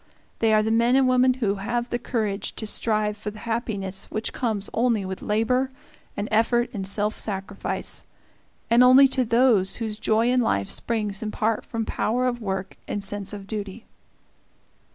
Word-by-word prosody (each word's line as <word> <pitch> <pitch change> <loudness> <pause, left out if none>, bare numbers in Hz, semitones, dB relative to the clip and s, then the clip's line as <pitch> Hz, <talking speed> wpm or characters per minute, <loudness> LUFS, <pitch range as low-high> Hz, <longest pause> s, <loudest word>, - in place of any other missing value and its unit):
They 225 -1 +3
are 215 0 +4
the 220 - 0
men 235 +2 +3
and 265 -1 +4
women 255 0 +4
who 210 -6 0
have 240 +3 -2
the 240 - -2
courage 215 -5 -2
to 220 - -5
strive 215 -1 0
for 210 0 -5
the 210 - -11
happiness 205 -5 -2
which 215 - -4
comes 215 -5 -1
only 230 -4 +1
with 190 0 -5
labor 240 +5 +1 0.5
and 205 - -2
effort 240 +3 +2
and 195 -3 -4
self 205 +2 0
sacrifice, 195 -1 -3 0.6
and 235 +2 +5
only 260 +2 +8
to 260 -1 +1
those 230 -5 +3
whose 220 -2 -4
joy 225 +3 +2
in 250 0 +3
life 100 - 0
springs 210 -4 -2
in 220 - -3
part 220 +1 -1
from 225 -1 -4
power 245 +4 0
of 240 -1 -1
work 190 -2 -4
and 205 - -3
sense 200 -1 -3
of 200 -2 -7
duty. 205 +1 -6
220 Hz, 175 wpm, -24 LUFS, 205-240 Hz, 0.6 s, only